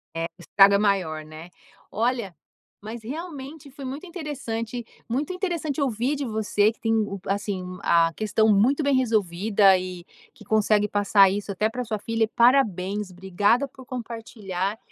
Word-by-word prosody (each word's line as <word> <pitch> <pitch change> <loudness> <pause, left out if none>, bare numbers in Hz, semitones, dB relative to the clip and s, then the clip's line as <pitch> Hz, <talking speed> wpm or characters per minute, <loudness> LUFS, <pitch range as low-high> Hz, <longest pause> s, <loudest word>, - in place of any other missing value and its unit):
É, 165 0 -1
o - - -11
estragado 195 +3 +5
é - - +5
maior, 185 -7 0
né. 155 +3 -11 0.4
Olha, 230 -4 -1 0.5
mas 220 +2 -8
realmente 290 +1 -7
foi 275 +1 -10
muito 275 +7 -6
interessante 250 - -5 0.2
muito 285 +10 -1
interessante 340 -6 -2
ouvir 255 +1 0
de 285 -1 -3
você 215 -2 +1
que 225 - -21
tem 225 -1 0
o 210 -2 -1
p 190 - -11
assim 200 -2 -2 0.2
a 165 -1 +3
questão 220 0 +1
muito 240 +9 +3
bem 285 0 +2
resolvida 205 -4 +3
e 180 -1 -6 0.3
que 245 - -16
consegue 210 0 +2
passar 200 -1 +4
isso 205 +1 -3
até 210 +3 0
pra 250 +2 -4
sua 220 -1 -2
filha. 225 0 0
Parabéns, 210 -6 +2
obrigada 190 +8 +1
por 260 -1 -15
compartilhar. 220 -5 -4
220 Hz, 160 wpm, -25 LUFS, 195-255 Hz, 0.5 s, estragado